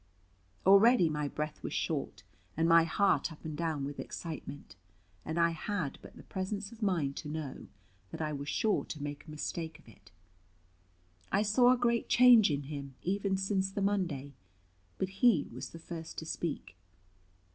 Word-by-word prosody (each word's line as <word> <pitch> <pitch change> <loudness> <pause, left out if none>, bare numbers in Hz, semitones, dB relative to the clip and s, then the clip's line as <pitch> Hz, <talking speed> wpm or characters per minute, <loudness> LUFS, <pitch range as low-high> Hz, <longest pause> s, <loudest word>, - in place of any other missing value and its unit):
Already 200 -1 +6
my 150 -1 -1
breath 150 +1 -4
was - - -5
short, 135 -10 -2 0.3
and 165 0 +3
my 165 0 +6
heart 195 +1 +2
up 160 - -13
and 155 -1 -4
down 155 -4 -2
with 145 0 -6
excitement, 155 - -7 0.5
and 160 +2 -3
I 170 0 +4
had 165 -2 -3
but - - -13
the - - -12
presence 195 +1 -4
of 230 0 -14
mind 165 -9 0
to 150 - -5
know 150 -3 -5 0.4
that - - -8
I 155 -1 -2
was 140 +1 -5
sure 215 -2 +1
to 150 -2 -6
make 145 +1 -6
a - - -10
mistake 160 +1 -4
of 160 - -23
it. 100 -3 -18 1.2
I 200 +2 +3
saw 245 +4 +5
a 255 - +4
great 235 -1 +1
change 240 -5 +7
in 145 -1 -1
him, 140 -2 -7
even 195 +1 0
since 195 0 0
the 200 - -3
Monday; 170 -9 -1 0.6
but 190 - -1
he 230 -12 +5
was 125 - -6
the - - -10
first 165 0 -8
to 160 - -5
speak. 160 - -4
165 Hz, 175 wpm, -32 LUFS, 150-195 Hz, 1.2 s, change